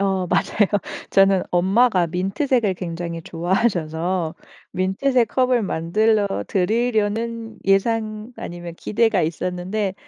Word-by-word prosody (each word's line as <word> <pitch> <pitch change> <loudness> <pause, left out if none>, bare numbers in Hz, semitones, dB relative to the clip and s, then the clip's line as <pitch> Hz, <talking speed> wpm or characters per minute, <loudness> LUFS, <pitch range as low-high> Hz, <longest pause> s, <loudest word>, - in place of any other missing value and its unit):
어 190 -2 0
맞아요. 205 -2 +2 0.4
저는 195 -1 +4
엄마가 190 +1 +3
민트색을 195 - 0
굉장히 170 -1 -5
좋아하셔서 175 -2 -1 0.4
민트색 230 +7 +1
컵을 255 -2 +2
만들러 200 - +1
드리려는 225 +2 -1
예상 215 +3 0
아니면 175 -1 -7
기대가 225 -3 +1
있었는데 180 +5 -2
195 Hz, 270 characters per minute, -22 LUFS, 175-225 Hz, 0.4 s, 저는